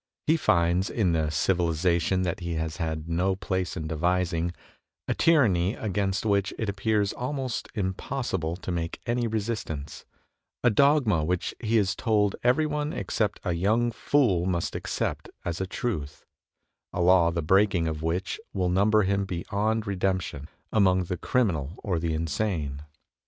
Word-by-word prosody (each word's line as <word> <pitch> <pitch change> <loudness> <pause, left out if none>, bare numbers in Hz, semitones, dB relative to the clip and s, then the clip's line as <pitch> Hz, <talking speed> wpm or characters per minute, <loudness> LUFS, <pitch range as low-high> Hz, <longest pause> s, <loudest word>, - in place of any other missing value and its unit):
He 160 - +4
finds 90 - +2
in 100 -7 +1
the 80 -2 +1
civi 90 +4 +1
lization 85 +2 +1
that 90 0 -2
he 85 -2 -3
has 80 -1 -3
had 80 -1 -3
no 90 +3 +1
place 95 -1 -2
in 80 - -4
devising, 85 +1 0 0.6
a - - +1
tyranny 110 - +3
against 100 0 -1
which 100 -2 +2
it 110 - -2
appears 100 +1 0
almost 130 -1 -3
impossible 95 -3 -2
to 90 0 -6
make 85 -1 -3
any 120 0 0
resistance, 105 -9 -4 0.6
a 125 - +5
dogma 125 - +4
which 90 +2 -1
he 115 -1 +1
is 100 -2 +2
told 105 -4 +1
every 125 +6 +3
one 150 +1 -2
except 105 - -1
a 90 - 0
young 110 +7 +2
fool 110 -9 +2
must 85 -2 -1
accept - - -3 0.2
as 85 +1 -2
a 95 - -2
truth, 75 -10 -4 0.7
a - - -5
law 90 -1 +5
the 85 -1 -2
break 95 +5 +4
ing 85 -2 +1
of 80 -1 -3
which 85 - -2
will 90 -2 0
number 105 +4 +4
him 100 +1 +1
beyond 100 +5 -1
redemption 95 -7 -2 0.2
among 95 -3 +4
the 90 +1 -3
criminal 85 - 0
or 90 -5 0
the 80 -1 -1
insane. 80 -3 -2
95 Hz, 155 wpm, -27 LUFS, 85-110 Hz, 0.7 s, a